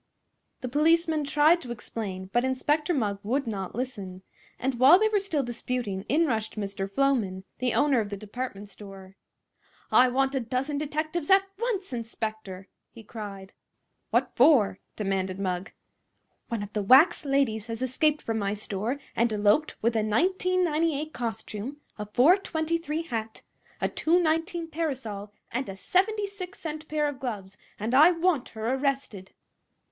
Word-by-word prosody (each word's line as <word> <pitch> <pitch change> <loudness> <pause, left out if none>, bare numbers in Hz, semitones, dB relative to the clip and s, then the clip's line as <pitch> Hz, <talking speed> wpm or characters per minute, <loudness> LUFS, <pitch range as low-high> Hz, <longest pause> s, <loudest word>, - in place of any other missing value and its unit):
The 255 - -3
policemen 315 +3 +2
tried 305 +4 +4
to 250 - -9
explain, 195 -4 -6
but 240 - +3
Inspector 295 +5 0
Mugg 210 - 0
would 265 +7 -1
not 200 -5 -4
listen; 200 -7 -5 0.3
and 255 -2 -2
while 270 +7 +8
they 435 +2 +2
were 420 -1 +2
still 335 -8 -1
disputing 240 -5 -3
in 320 +5 +3
rushed 220 -6 -2
Mr. 195 -1 -3
Floman, 205 -6 0 0.2
the 250 -1 0
owner 285 -4 +3
of 210 -2 -2
the 200 - -5
department 210 0 -6
store. 195 -1 -12 0.8
"I 255 0 +6
want 270 +2 +1
a 270 - +1
dozen 260 +4 -2
detectives, 310 +2 -3
at 385 0 +6 0.2
once, 415 - -2
inspector!" 220 -5 -5 0.2
he 230 - -13
cried. 200 -3 -8 0.6
"What - - +1
for?" 245 -8 +5 0.2
demanded 195 -2 -2
Mugg. 185 0 -3 0.8
"One 230 -3 -3
of 205 +1 -9
the 210 - 0
wax 260 - +6
ladies 270 -6 0
has 230 +2 -4
escaped 295 +4 +1
from 225 -1 -1
my 200 0 -1
store 215 +5 -3 0.2
and 235 0 +2
eloped 210 +8 +2
with 230 +1 +2
a - - +3
$19.98 330 - +1
costume, 225 +2 -5 0.2
a 210 - -4
$4.23 325 - +1
hat, 225 -2 -4 0.4
a - - +1
$2.19 330 0 0
parasol 250 -11 -4 0.2
and 255 0 -2
a 195 - -7
76 395 - -1
cent 310 -1 -6
pair 300 -1 0
of 285 -3 -5
gloves, 205 -7 -5 0.2
and 220 +4 -2
I 300 +6 +8
want 335 -5 +1
her 225 +3 -1
arrested!" 265 -8 -2
255 Hz, 150 wpm, -27 LUFS, 210-310 Hz, 0.8 s, while